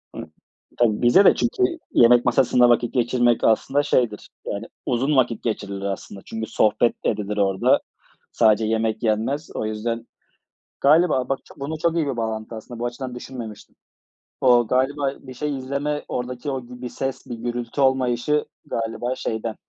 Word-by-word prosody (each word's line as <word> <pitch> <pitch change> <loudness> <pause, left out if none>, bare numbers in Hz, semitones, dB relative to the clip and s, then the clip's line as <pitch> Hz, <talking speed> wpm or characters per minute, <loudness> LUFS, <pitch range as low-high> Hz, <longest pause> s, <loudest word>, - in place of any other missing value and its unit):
Hı, - - -5 0.6
tabii, 110 -3 +2
bizde 120 +12 +6
de - - +7
çünkü 375 +11 0 0.3
yemek 120 0 +5
masasında 125 -1 +4
vakit 120 0 +2
geçirmek 120 -1 +2
aslında 135 +6 +2
şeydir, 115 -7 0 0.2
yani 100 +3 -4 0.2
uzun 135 +4 +1
vakit 120 -4 +1
geçirilir 100 -3 -3
aslında. 100 0 -5
Çünkü 110 -1 -5
sohbet 115 +2 +2
de - - +4
edilir 105 0 -3
orada. 95 -1 +3 0.5
Sadece 110 -1 +3
yemek 110 0 -1
yenmez. 115 +8 0
O - - -2
yüzden 115 +2 -3 0.7
galiba 150 -3 +4
bak, 135 - 0 0.2
bunun 145 +3 -4
çok 170 +1 0
iyi 160 -3 +1
bir 130 -3 -3
bağlantısı 110 0 -3
aslında. 115 +2 -9
Bu 120 - -2
açıdan 125 +1 -5
düşünmemiştim. 120 -4 -9 0.7
O 120 -2 +5
galiba 135 +2 +1
bir 130 - -9
şey 145 +1 -3
izleme, 140 +3 -3
oradaki 125 +3 -4
o 130 -2 -3
b 120 - -17
bir 125 - -3
ses, 135 +2 -4
bir 120 - -5
gürültü 120 +3 -4
olmayışı 130 +2 +2 0.2
galiba 115 +2 -3
şeyden, 110 -2 -4
120 Hz, 160 wpm, -23 LUFS, 110-135 Hz, 0.7 s, de